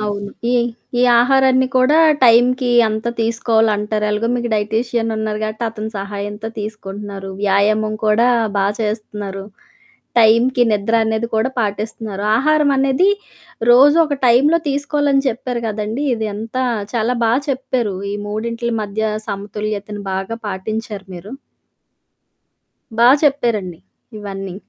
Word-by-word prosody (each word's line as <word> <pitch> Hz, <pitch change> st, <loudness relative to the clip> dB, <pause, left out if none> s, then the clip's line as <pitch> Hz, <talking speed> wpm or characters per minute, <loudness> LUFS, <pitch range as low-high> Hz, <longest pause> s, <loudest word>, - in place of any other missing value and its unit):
అవును. 205 Hz, -1 st, -3 dB, 0.2 s
ఈ -, -, +1 dB, 0.5 s
ఈ -, -, +3 dB, 0.2 s
ఆహారాన్ని 260 Hz, 0 st, +3 dB
కూడా 260 Hz, +5 st, +4 dB, 0.3 s
టైంకి 245 Hz, +1 st, +4 dB, 0.2 s
అంతా 220 Hz, +2 st, -3 dB
తీసుకోవాలంటారు. 220 Hz, -2 st, +1 dB
ఎలాగో 215 Hz, +2 st, -1 dB
మీకు 240 Hz, -1 st, -2 dB
డైటీషియన్ 225 Hz, +2 st, -1 dB
ఉన్నారు 215 Hz, -1 st, -2 dB
గాబట్టి, 215 Hz, +2 st, -3 dB
అతని 220 Hz, 0 st, -6 dB
సహాయంతో 205 Hz, +2 st, -5 dB
తీసుకుంటున్నారు. 205 Hz, -2 st, -7 dB
వ్యాయామం 215 Hz, +2 st, +2 dB
కూడా 230 Hz, +3 st, +3 dB, 0.3 s
బా 195 Hz, -, +2 dB, 0.2 s
చేస్తున్నారు. 210 Hz, -2 st, -4 dB, 0.7 s
టైంకి 235 Hz, +3 st, +4 dB
నిద్ర 210 Hz, +2 st, 0 dB
అనేది 220 Hz, +1 st, -1 dB
కూడా 225 Hz, +4 st, +1 dB
పాటిస్తున్నారు. 210 Hz, -1 st, -4 dB
ఆహారం 300 Hz, +3 st, +2 dB
అనేది 270 Hz, +7 st, +2 dB, 0.6 s
రోజు 280 Hz, +6 st, +6 dB
ఒక 290 Hz, -, -1 dB
టైంలో 280 Hz, +8 st, +4 dB
తీసుకోవాలని 285 Hz, 0 st, +1 dB
చెప్పారు 245 Hz, 0 st, -4 dB
కదండీ! 215 Hz, +5 st, -3 dB
ఇది 220 Hz, -1 st, -3 dB
అంతా 230 Hz, +5 st, -3 dB, 0.3 s
చాలా 235 Hz, +1 st, 0 dB
బాగా 235 Hz, +5 st, +2 dB
చెప్పారు. 255 Hz, -6 st, -2 dB, 0.2 s
ఈ -, -, -3 dB
మూడింటిల 230 Hz, +3 st, -3 dB
మధ్య 210 Hz, +1 st, -4 dB, 0.3 s
సమతుల్యతను 205 Hz, 0 st, -5 dB
బాగా 195 Hz, +4 st, -3 dB
పాటించారు 205 Hz, +1 st, -5 dB
మీరు. 195 Hz, +7 st, -10 dB, 1.7 s
బా 235 Hz, -, +6 dB
చెప్పారండి. 230 Hz, -, 0 dB, 0.4 s
ఇవన్నీ. 195 Hz, -2 st, -6 dB
220 Hz, 115 wpm, -18 LUFS, 210-245 Hz, 1.7 s, రోజు